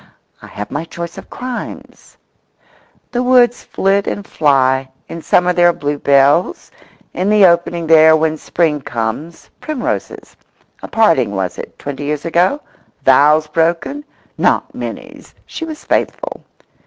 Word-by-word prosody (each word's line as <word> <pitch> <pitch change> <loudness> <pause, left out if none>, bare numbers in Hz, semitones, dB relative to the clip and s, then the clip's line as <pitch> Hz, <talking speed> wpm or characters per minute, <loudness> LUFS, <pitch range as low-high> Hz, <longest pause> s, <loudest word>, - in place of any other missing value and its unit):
I - - -12
have 105 0 -8
my 145 - -3
choice 170 0 -7
of - - -14
crimes. 250 -1 -8 0.9
The 245 - -1
woods 245 -1 +3
flit 195 +1 0
and 205 - -4
fly—in 135 +1 0
summer 180 +2 +2
there 175 0 +4
are - - +1
bluebells; 145 +1 +1 0.4
in 190 +2 -1
the 210 -2 +6
opening 170 -1 +1
there, 160 0 +6
when 160 0 0
Spring 155 -2 -1
comes, 120 +9 -5
primroses. 305 -5 -5 0.5
A - - -7
parting, 160 - +2
was 95 -2 -3
it, - - -9
twenty 145 0 -6
years 150 0 -3
ago? 175 - +1 0.4
Vows 150 +4 +5
broken? 170 - -1 0.4
Not - - +1
Minnie's!… - - -8
She 325 - -6
was 310 -1 -9
faithful. - - -2
165 Hz, 130 wpm, -16 LUFS, 145-195 Hz, 0.9 s, the